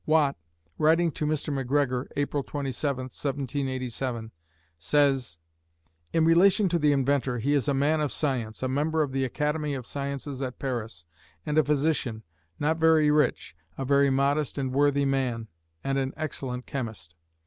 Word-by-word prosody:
Watt, 155 -3 +3 0.4
writing 165 +2 +4
to 150 - -3
Mr. 150 -1 -1
Macgregor, 135 -1 0
April 145 0 0
27, 135 -1 -3
1787, 130 -3 -3 0.5
says: 135 - +2 0.7
In 160 -1 +3
relation 185 +5 +5
to 170 0 +1
the 150 -1 +4
inventor, 135 -2 +1
he 135 +6 0
is 145 -1 +1
a 140 - +2
man 150 +3 +2
of 150 - 0
science, 125 -6 -1
a - - +1
member 155 +4 +1
of 140 - -4
the 135 0 0
Academy 150 +2 -1
of 130 -3 -6
Sciences 140 0 -4
at 130 -2 -4
Paris, 115 - -4 0.4
and 150 +1 +2
a - - +5
physician, 145 -6 0 0.3
not 160 +2 +1
very 160 -2 +4
rich, 150 - +1 0.2
a 135 - -3
very 140 +1 +4
modest 140 +2 +1
and 130 -2 -2
worthy 140 0 +3
man, 130 -4 -1 0.4
and 135 0 0
an 135 0 -2
excellent 130 -5 -4
chemist. 110 -12 -6
140 Hz, 155 wpm, -27 LUFS, 130-150 Hz, 0.7 s, relation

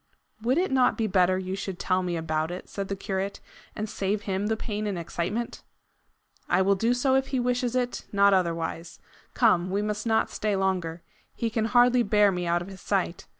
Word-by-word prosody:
"Would 250 +5 +1
it 365 -2 +1
not 260 -1 +3
be 225 - 0
better 185 -2 +3
you 185 0 -3
should 195 -2 -5
tell 185 -1 +1
me 175 -2 -2
about 160 -1 -1
it," 180 +1 -7
said 200 -1 -5
the 195 - -3
curate, 195 0 -3 0.4
"and 215 - -3
save 205 0 -2
him 195 +1 -1
the 220 0 0
pain 210 -1 -3
and 200 -3 -2
excitement?" 175 +7 -3 0.9
"I 190 +1 +3
will 200 +1 +4
do 230 +5 +1
so, 260 +2 +2
if 265 0 +2
he 265 - -1
wishes 245 0 0
it, 245 -1 -2
not 200 0 +5
otherwise. 170 -2 -1 0.4
Come; 185 -7 +3
we 200 +2 0
must 210 +1 -3
not 220 0 +2
stay 210 -1 -1
longer. 180 -4 -1 0.3
He 230 -1 -2
can 220 0 0
hardly 245 +1 +4
bear 210 -2 +4
me 180 -1 -3
out 175 +1 +1
of - - -11
his 190 -2 -11
sight. 190 -3 -1
200 Hz, 205 wpm, -27 LUFS, 185-225 Hz, 0.9 s, not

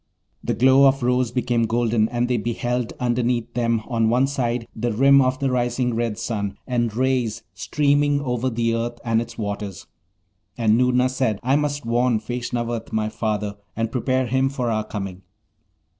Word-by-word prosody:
The - - -1
glow 130 +2 +6
of 135 -1 +1
rose 125 0 +2
became 120 -2 0
golden, 115 -1 +1
and 120 0 0
they 125 -1 +1
beheld 120 +2 -2
underneath 120 -1 0
them, 115 -2 0
on 115 -3 +1
one 125 +3 +3
side, 125 -4 -2
the 120 +2 -1
rim 135 +5 +5
of 130 0 +1
the 135 -1 -1
rising 125 0 0
red 115 -2 -1
sun, 100 -4 -3
and 120 -3 0
rays 125 -3 0
streaming 145 +7 +1
over 130 -2 -1
the 115 -1 0
earth 120 +1 -2
and 115 -1 +2
its 115 0 -8
waters. 100 -3 -5 0.7
And 110 -2 +3
Noorna 125 +1 +3
said, 130 -5 -1
'I 130 +3 +2
must 145 -2 -2
warn 120 0 +2
Feshnavat, 120 0 -4
my 110 -1 0
father, 105 -2 -2 0.2
and 115 0 -2
prepare 130 +1 0
him 130 +2 +1
for 125 -4 -2
our 110 -1 0
coming.' 95 -3 -6
120 Hz, 170 wpm, -22 LUFS, 115-130 Hz, 0.7 s, glow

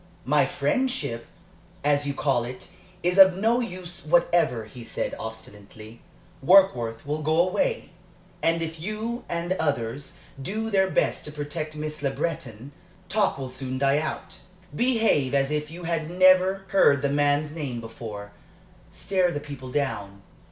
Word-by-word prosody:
"My - - +3
friendship, 260 - -1 0.6
as 145 0 +2
you 140 - -2
call 135 -5 +1
it, 125 +1 -8 0.3
is 180 +2 +2
of 190 -1 +8
no 225 +4 +2
use 180 -6 -5
whatever," 160 -7 +2
he 120 +3 -11
said, - - -4
obstinately. 110 0 -10 0.4
"Warkworth 130 -11 +4
will 150 +2 -2
go 155 +2 +1
away, 190 - 0 0.5
and 165 0 +1
if 160 0 -6
you 215 +6 -4
and 170 +1 -1
others 135 0 -2 0.2
do 220 +8 -3
their 190 -1 +3
best - - 0
to 150 - -6
protect 155 +1 -5
Miss 155 0 -5
Le 140 - +1
Breton, 135 -4 -4 0.4
talk 205 +1 +1
will 130 -2 -6
soon 130 0 -4
die 140 +2 +3
out. 155 - -5 0.4
Behave 225 - +2
as 135 +1 +2
if 150 0 -2
you 175 +2 -9
had 165 -2 -2
never 185 +1 +4
heard 140 -8 +4
the 140 - +2
man's 145 +1 +1
name 140 -7 -4
before 110 -3 -8 0.6
stare 185 -3 0
the 145 - -3
people 140 -3 -9
down. 100 -8 -3
150 Hz, 150 wpm, -25 LUFS, 130-185 Hz, 0.6 s, of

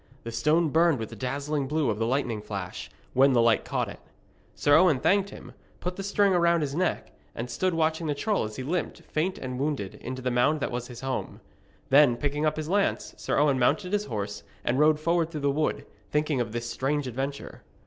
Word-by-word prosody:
The 115 - -5
stone 150 +8 +2
burned 165 0 +4
with 110 -2 -5
the 115 - -9
dazzling 140 +4 -2
blue 150 -3 +1
of 105 - -4
the 115 - +1
lightning 120 -4 -1
flash, 100 -4 -6 0.2
when 135 +1 +5
the 120 - +4
light 115 -2 +3
caught - - -1
it. - - -9 0.6
Sir 145 0 +4
Owen 160 -6 +5
thanked 200 +6 +2
him, - - -11 0.3
put 180 0 -4
the 195 - -5
string 200 0 +2
about 170 -1 +3
his 140 -2 -2
neck, 180 +3 -1 0.2
and 120 +1 -5
stood 180 +8 0
watching 160 0 0
the 145 - 0
troll 205 +8 0
as 110 0 -5
he 130 - -5
limped, 170 +5 -3
faint 175 +5 -2
and 125 -1 -5
wounded, 140 -9 -2
into 130 +1 -5
the 125 - 0
mound 125 +6 +2
that - - -2
was 120 0 -4
his 125 -1 -10
home. 130 -1 -4 0.5
Then, 135 -3 +6
picking 145 +2 0
up 155 - -1
his 155 -1 -3
lance, 200 +3 0
Sir - - -2
Owen 145 -3 +3
mounted 180 +10 +1
his 205 0 +1
horse, 105 -3 -4 0.2
and 125 +3 +1
rode 150 0 +4
forward 165 +1 +1
through 155 -3 -5
the 140 0 +2
wood, 150 +2 -1 0.2
thinking 150 -3 +1
of 115 - -3
this 120 +1 -4
strange 135 +5 -1
adventure. 135 +3 -5
145 Hz, 220 wpm, -27 LUFS, 125-160 Hz, 0.6 s, Then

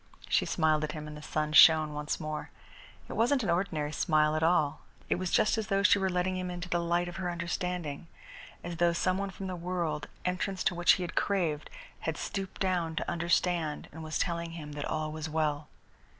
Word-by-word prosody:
She - - +2
smiled 155 -2 +2
at 150 - -2
him 150 -1 -6
and 150 - -8
the 150 - -9
sun 155 0 -2
shone 155 -1 +8
once 150 0 -3
more. 155 -1 -4 0.6
It - - -6
wasn't 250 +3 +2
an 200 - +1
ordinary 165 -4 -1
smile 155 -1 +2
at 155 - 0
all. 160 -3 +2 0.3
It - - +1
was 185 -1 -2
just 220 +5 +3
as 215 - -3
though 195 0 +1
she 205 - +5
were 190 0 +1
letting 180 +1 0
him 185 0 -3
into 175 0 -5
the 175 -1 0
light 170 +1 0
of 175 - -7
her 185 -2 -2
understanding, 170 -2 -3 0.6
as 175 -1 -5
though 170 0 +3
some 185 +2 +1
one 200 0 -2
from 190 +1 -7
the 185 -1 -3
world, 170 -4 -2 0.2
entrance 185 +1 -1
into - - +2
which 175 0 +5
he 185 - -1
had 175 - -5
craved, 170 -7 0 0.3
had - - -3
stooped 195 -1 -4
down 175 -4 0
to - - -2
understand 170 -2 0
and 160 +1 -9
was 155 0 -2
telling 170 -2 -2
him 150 -3 -7
that 145 -1 -4
all 155 -1 -2
was 155 0 -5
well. 150 -1 -1
170 Hz, 215 wpm, -30 LUFS, 155-180 Hz, 0.6 s, shone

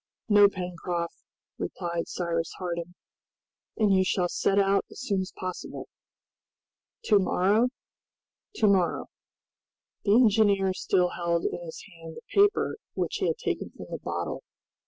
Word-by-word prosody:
"No, 205 -2 +7
Pencroft," 180 -2 -4 0.5
replied 170 -2 -3
Cyrus 165 -2 -2
Harding; 175 -1 -4 0.8
"and 210 -3 +3
you 190 0 +4
shall 180 -1 +1
set 195 - +1
out 195 0 +3
as - - -11
soon 200 -7 0
as 185 - -6
possible." 185 -1 -6 1.2
"To 210 -2 +4
morrow?" 200 +5 +2 0.9
"To 220 - +3
morrow!" 190 -3 +2 0.9
The 205 0 +4
engineer 205 -5 +4
still 180 -1 +1
held 170 -1 -1
in 175 - -2
his 165 -1 -8
hand 165 -3 -11
the - - -9
paper 410 +2 +3 0.2
which - - -1
he - - 0
had 475 - 0
taken - - -3
from - - -11
the - - -4
bottle. - - -4
185 Hz, 135 wpm, -27 LUFS, 175-205 Hz, 1.2 s, No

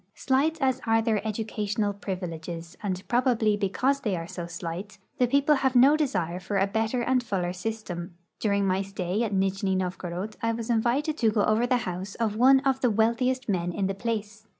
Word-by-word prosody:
Slight 290 +5 +1
as 260 -2 +1
are 225 0 +4
their 220 -3 +1
educational 210 -1 -2
privileges, 175 -3 -6
and 190 -2 -3
probably 240 -4 +2
liecause 250 +8 0
they 210 -7 0
are 165 -1 -4
so 170 0 -6
slight, 175 +4 -6 0.2
the 250 - +4
])eople 280 +3 +3
have 265 -1 +1
no 270 +5 +7
desire 180 - -1
for 195 +2 -3
a 195 - +3
better 220 +4 -1
and 255 +1 +2
fuller 185 -6 -2
system. 180 -3 -5 0.2
Daring 200 -2 +1
my 190 0 +1
stay 195 +1 -2
at 225 -3 0
Nijni 195 0 +1
Novgorod 185 +2 -4
I 230 0 +1
was 230 +1 -3
invited 250 +7 +1
to 225 - +4
go 210 -1 +1
over 220 +3 +2
the 250 0 +3
house 185 +2 -5
of 220 -3 -1
one 265 +4 +6
of 270 -2 0
the 250 - +3
wealthiest 235 +4 +1
men 175 -4 0
in 195 +2 -1
the 195 0 -2
])lace. 220 -1 -3
215 Hz, 195 wpm, -27 LUFS, 190-245 Hz, 0.2 s, no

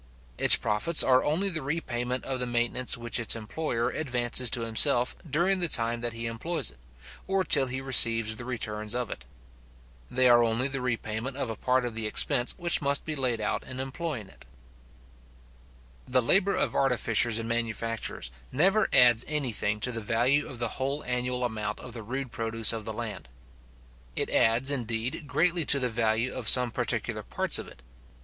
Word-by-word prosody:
Its - - +9
profits 110 +11 +2
are 130 -1 +3
only 165 +7 0
the 165 -5 -2
repayment 125 -4 -3
of 130 -1 -3
the 125 - -3
maintenance 120 +1 0
which 120 0 -2
its 115 - +1
employer 115 +2 -3
advances 125 -4 -1
to 120 - +1
himself 120 +3 +4
during 175 +7 +1
the 175 - +3
time 115 -4 +2
that 120 0 -2
he 115 +1 -6
employs 135 +6 -2
it, - - -23 0.5
or 195 0 0
till 140 -6 +1
he 130 +1 -4
receives 115 -4 +6
the 120 - -6
returns 110 -3 -4
of 125 -2 -2
it. - - -8 0.8
They 130 0 +2
are 120 -1 +5
only 115 +3 0
the 135 -1 -4
repayment 120 +1 -4
of 130 -5 -3
a - - -6
part 125 +3 0
of 120 - -4
the 110 -1 -4
expense 120 +3 +1
which 170 -2 +1
must 140 0 -1
be 155 - -3
laid 125 -5 -1
out 105 - -2
in 130 0 -9
employing 135 - -5
it. - - -18 1.6
The 130 0 +2
labour 195 - +2
of - - -1
artificers 120 -3 +1
and 115 0 -5
manufacturers 115 - -4 0.2
never 195 +9 +2
adds 120 -2 +4
any 150 -5 -2
thing 105 0 -2
to 125 - -1
the 115 -1 -5
value 120 +7 0
of 130 - -9
the 120 -1 -4
whole 140 +2 -2
annual 125 0 -2
amount 105 -3 -4
of 125 - -11
the 115 - -6
rude 130 +3 -6
produce 115 0 -1
of 110 -2 -6
the 110 - -4
land. 110 - -7 0.9
It - - -2
adds, 120 +5 +2
indeed, 120 +3 -4
greatly 165 +4 +1
to 140 - +5
the 125 -2 -1
value 115 +2 -1
of 120 -4 +3
some 125 -2 +7
particular - - -3
parts - - -1
of - - -7
it. 65 - -15
125 Hz, 185 wpm, -27 LUFS, 115-135 Hz, 1.6 s, Its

